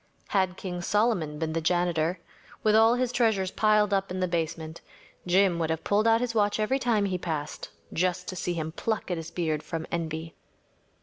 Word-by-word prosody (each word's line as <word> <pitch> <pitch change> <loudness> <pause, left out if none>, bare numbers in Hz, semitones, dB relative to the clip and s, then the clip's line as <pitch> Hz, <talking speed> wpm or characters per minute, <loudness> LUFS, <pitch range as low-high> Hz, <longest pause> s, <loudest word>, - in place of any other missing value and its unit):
Had 190 -2 +1
King 180 -2 -5
Solomon 185 -7 +1
been 160 0 -2
the 165 - -1
janitor, 175 0 +1 0.4
with 215 0 +4
all 225 +2 +6
his 250 -1 0
treasures 220 -7 +1
piled 210 -1 +3
up 195 0 +1
in 185 +1 -4
the 185 - +1
basement, 165 -1 -3 0.5
Jim 180 -1 +3
would 160 -1 0
have 160 0 -2
pulled 210 +2 +2
out 225 +1 +4
his 245 -2 -1
watch 205 -1 +2
every 255 +6 +1
time 230 -5 +2
he 185 -2 -1
passed, 155 -4 -4 0.2
just 180 +1 0
to 185 - -5
see 175 0 -2
him 160 -1 -3
pluck 215 +3 -2
at 175 - 0
his 165 0 -6
beard 155 -4 -1
from 160 0 -5
envy. 160 -1 -3
180 Hz, 195 wpm, -27 LUFS, 165-210 Hz, 0.5 s, all